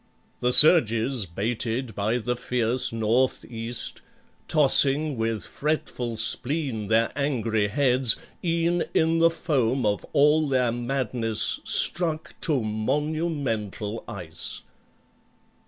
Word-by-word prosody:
The 125 - +1
surges 125 - +5
baited 115 +6 -3
by 105 +4 -1
the 125 +1 -2
fierce 125 0 0
North 115 +3 0
east, 115 0 -5 0.5
Tossing 145 0 +3
with 115 -1 -2
fretful 125 -6 -3
spleen 125 -1 -1
their 115 +2 +2
angry 115 -7 -1
heads, 125 +1 +3 0.3
E'en 170 0 0
in 165 +1 +2
the 165 0 +5
foam 135 - -1
of 105 -1 -1
all 150 +1 +3
their 130 -3 +1
madness 120 -2 0
struck 160 -3 0
To 140 -7 0
monumental 115 - -3
ice. - - -7
125 Hz, 105 wpm, -24 LUFS, 115-150 Hz, 0.5 s, surges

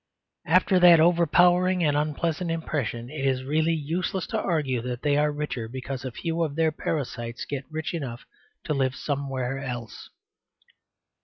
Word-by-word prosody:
After 185 +2 +4
that 175 -2 +8
overpowering 175 +2 +4
and 145 -2 +2
unpleasant 155 +3 -1
impression 140 -7 -3
it 150 -3 -5
is 130 -1 +1
really 155 +4 +1
useless 170 +4 -2
to - - +1
argue 145 -8 0
that 125 +1 -5
they 145 -1 +2
are 150 +1 +2
richer 145 -6 -4
because 130 +2 -6
a 130 - -4
few 165 +6 -3
of 155 -4 -1
their 160 0 +2
parasites 120 -7 -4
get 140 -2 -4
rich 160 +1 -4
enough 130 -7 -5 0.4
to 155 - -1
live 130 -2 0
somewhere 135 -2 -3
else. 120 -4 -6
150 Hz, 155 wpm, -26 LUFS, 130-165 Hz, 0.4 s, that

